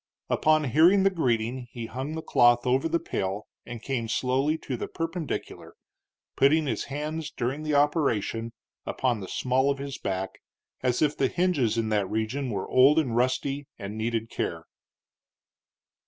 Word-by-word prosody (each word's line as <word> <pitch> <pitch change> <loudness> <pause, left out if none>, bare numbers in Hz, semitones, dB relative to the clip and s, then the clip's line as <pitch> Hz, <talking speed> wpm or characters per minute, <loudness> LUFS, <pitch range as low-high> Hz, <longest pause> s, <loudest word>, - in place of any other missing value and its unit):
Upon 155 0 +3
hearing 165 - +5
the 195 - +4
greeting 125 -6 -1
he 120 -1 -6
hung 130 +6 -5
the 160 - -5
cloth 120 0 +4
over 130 +5 +2
the 170 - +2
pail 95 -4 -3 0.2
and 120 -1 -7
came 125 -4 -2
slowly 130 +6 +1
to 135 - -5
the - - -4
perpendicular, 165 -2 -5 0.6
putting 150 +3 +4
his 115 -6 -2
hands, 150 +2 -4
during 135 +1 -3
the 155 -1 -1
operation, 120 - +1 0.3
upon 125 -4 -1
the 95 - -7
small 130 +5 +1
of 140 - 0
his 140 -1 -6
back, 95 -1 -4 0.4
as 125 +2 +1
if 150 0 +2
the 135 - +2
hinges 145 -10 +1
in 110 -1 0
that 105 -3 0
region 115 +5 -2
were 100 -4 -3
old 135 +4 +5
and 130 -8 +1
rusty 135 +3 0
and 100 -1 -6
needed 115 0 -2
care. 80 -1 -3
130 Hz, 160 wpm, -27 LUFS, 115-150 Hz, 0.6 s, hearing